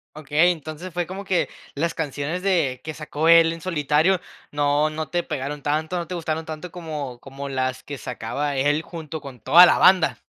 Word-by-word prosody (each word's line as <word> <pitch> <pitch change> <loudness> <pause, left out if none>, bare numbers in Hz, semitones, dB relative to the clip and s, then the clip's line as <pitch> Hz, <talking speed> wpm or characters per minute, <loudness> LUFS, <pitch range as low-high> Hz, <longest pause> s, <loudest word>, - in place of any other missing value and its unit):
Okey. 155 +3 +3
Entonces, 160 +2 -7
fue 175 -1 -1
como 190 +3 -7
que 190 -3 +1 0.3
las 165 +4 -1
canciones 150 +3 -3
de 170 -10 +1
que 155 - -5
sacó 150 +1 -3
él 165 -1 +7
en 165 - -9
solitario, 160 +2 +2 0.3
no 145 +1 +2
no 155 -1 -5
te 175 - 0
pegaron 145 -1 -4
tanto, 155 +5 -1
no 170 - -4
te 180 - -5
gustaron 160 -1 -3
tanto 160 +2 -7
como 150 -8 -6
como 140 +1 -8
las 130 -1 -2
que 145 -1 -7
sacaba 140 +7 -3
él 145 +3 +2
junto 160 -2 -7
con 135 -4 -10
toda 175 +10 +8
la - - +4
banda. 180 -10 +5
155 Hz, 190 wpm, -23 LUFS, 145-170 Hz, 0.3 s, toda